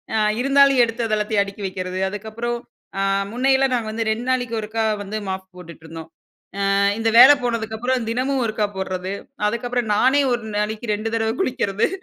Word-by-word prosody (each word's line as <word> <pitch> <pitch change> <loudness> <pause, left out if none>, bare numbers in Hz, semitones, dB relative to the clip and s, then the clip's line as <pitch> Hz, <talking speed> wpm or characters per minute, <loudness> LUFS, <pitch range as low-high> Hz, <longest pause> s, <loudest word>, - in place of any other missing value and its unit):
அ - - +2 0.2
இருந்தாலும் 275 -1 +5
எடுத்து 230 0 -2
அத 215 -1 +1
எல்லாத்தையும் 210 -1 +1
அடுக்கி 200 +1 -9
வெக்குறது 185 -1 -4
அதுக்கப்புறம், 220 +4 -4 0.4
அ - - +1 0.3
முன்னையெல்லாம் 265 +2 +2
நாங்க 225 -3 -2
வந்து 225 0 -3
2 225 +3 -3
நாளைக்கு 245 -3 0
ஒருக்கா 220 +1 -2 0.2
வந்து 210 +2 -4
மாப் 190 0 -5
போட்டுட்டுருந்தோம். 165 -2 -11 0.6
அ - - +2 0.2
இந்த 225 0 +1
வேல 265 +4 +10
போனதுக்கப்புறம் 230 +1 -2
தினமும் 260 +2 0
ஒருக்கா 215 -1 -1
போடுறது 185 0 -3 0.4
அதுக்கப்புறம் 240 0 -2
நானே 265 +6 +4
1 240 -1 -2
நாளைக்கு 215 +1 -2
2 220 +2 -4
தடவ 225 0 0
குளிக்குறது. 230 - 0
225 Hz, 160 wpm, -21 LUFS, 205-245 Hz, 0.6 s, வேல